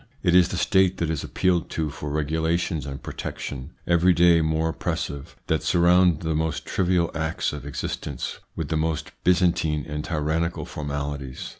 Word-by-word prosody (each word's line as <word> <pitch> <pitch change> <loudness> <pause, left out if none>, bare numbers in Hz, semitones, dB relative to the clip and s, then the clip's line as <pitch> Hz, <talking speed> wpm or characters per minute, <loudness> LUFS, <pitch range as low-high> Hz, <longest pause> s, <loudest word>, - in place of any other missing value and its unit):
It 90 -2 +3
is 90 -1 +6
the 90 - -4
State 95 -1 +3
that 85 -2 -1
is 80 - -2
appealed 90 -4 +1
to 80 -2 0
for 75 +1 -6
regulations 80 +1 -1
and 70 0 -7
protection, 70 +3 -6
every 85 +1 +4
day 85 -1 +5
more 80 +1 0
oppres - - -2
sive, 70 -1 -8
that 80 - +1
surround 90 -1 +4
the 80 -1 -1
most 80 0 -1
trivial 90 -2 +1
acts 80 -1 -1
of 75 -1 -7
existence 70 - -4 0.2
with - - -4
the 80 - +1
most 80 -1 -1
Byzantine 85 -5 +2
and 75 -1 -4
tyrannical 80 +1 -1
formalities. 70 -2 -5
80 Hz, 165 wpm, -25 LUFS, 75-85 Hz, 0.2 s, is